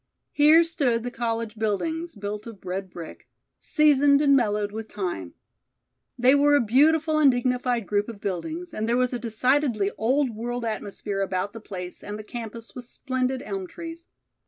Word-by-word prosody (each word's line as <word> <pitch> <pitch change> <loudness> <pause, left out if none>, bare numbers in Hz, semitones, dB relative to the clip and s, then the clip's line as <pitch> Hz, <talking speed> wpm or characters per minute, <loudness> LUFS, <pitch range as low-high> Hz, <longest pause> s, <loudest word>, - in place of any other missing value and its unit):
Here 305 +3 +6
stood 270 -9 0
the 245 - -4
college 230 -2 -3
buildings, 320 - -2
built 205 +1 -5
of 210 -5 -11
red 185 +1 -4
brick, 170 -2 -10 0.3
seasoned 290 -2 +4
and 285 -1 +5
mellowed 210 -4 +1
with 220 +1 -6
time. 175 - -4 0.8
They 250 +2 +5
were 290 +1 +5
a - - +5
beautiful 310 +7 +3
and 290 -2 +7
dignified 245 -2 0
group 205 +3 0
of 220 -3 -8
buildings, 315 - -4
and 220 +1 -2
there 240 - +2
was 255 0 +1
a 245 - -2
decidedly 235 -2 +1
old 260 +3 +2
world 235 +2 -4
atmosphere 205 -2 -3
about 190 +1 -2
the 225 - -9
place 180 -4 -7
and 210 0 -5
the 215 - -8
campus 230 0 -8
with 250 -1 -8
splendid 255 +1 -2
elm 195 -2 -4
trees. 335 - -9
235 Hz, 170 wpm, -25 LUFS, 210-280 Hz, 0.8 s, and